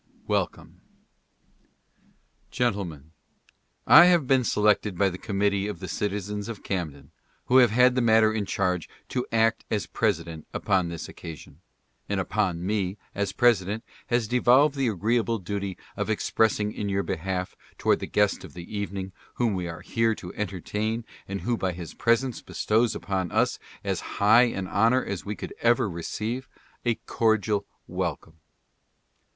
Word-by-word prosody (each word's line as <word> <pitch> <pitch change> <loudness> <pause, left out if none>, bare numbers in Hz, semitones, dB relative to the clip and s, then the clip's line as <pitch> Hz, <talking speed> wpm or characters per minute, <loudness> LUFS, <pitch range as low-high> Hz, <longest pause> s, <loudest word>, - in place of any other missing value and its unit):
WELCOME. - - -2 1.7
Gentlemen 95 - -2 0.4
:— - - -46 0.2
I - - +9
have 175 -5 +4
been 130 0 +3
selected 105 -3 +2
by 100 0 +3
the 90 0 -7
committee 100 0 0
of 105 - -5
the 95 - -6
citizens 105 +3 -3
of 110 -4 -7
Camden 75 -8 -4 0.3
who 130 - +4
have 125 -3 +7
had 125 +3 +5
the 125 - +1
matter 110 -2 +5
in 105 -3 -2
charge 90 -4 -1 0.2
to 125 - -2
act 115 0 +2
as 105 -2 -1
president 85 -7 -2
upon 95 -3 +1
this 85 -2 -6
occasion, 80 -4 -10 0.5
and - - 0
upon 85 -1 -1
me, 100 -1 -1 0.2
as 100 0 -1
president, 110 -3 +2 0.2
has 120 -2 +1
devolved 125 +5 +4
the 135 -3 0
agreeable 115 +3 +1
duty 100 0 -4 0.2
of - - -3
expressing 105 -2 +1
in 105 -1 -4
your 100 0 0
behalf 90 +2 -3 0.2
toward - - +2
the - - -5
guest 105 -1 +1
of - - -11
the 85 +4 -8
evening, 100 -1 -4 0.2
whom 120 -3 +1
we 90 -2 -2
are 85 +1 -7
here 115 +3 +1
to 90 - -9
entertain 105 +4 -3 0.2
and 100 0 -4
who 120 0 0
by 95 -5 -1
his 85 -1 -8
presence 120 +1 +1
bestows 115 +2 +1
upon 95 -3 -2
us - - +1 0.2
as - - -1 0.2
high 110 +5 +6
an 100 -5 -3
honor 115 +7 +2
as 100 -3 -4
we 105 +1 -3
could - - -7
ever 120 0 +3
receive, 110 +8 -4 0.4
a 120 -1 +2
cordial 110 -2 +1 0.2
welcome. 80 0 -4
105 Hz, 155 wpm, -26 LUFS, 95-115 Hz, 1.7 s, I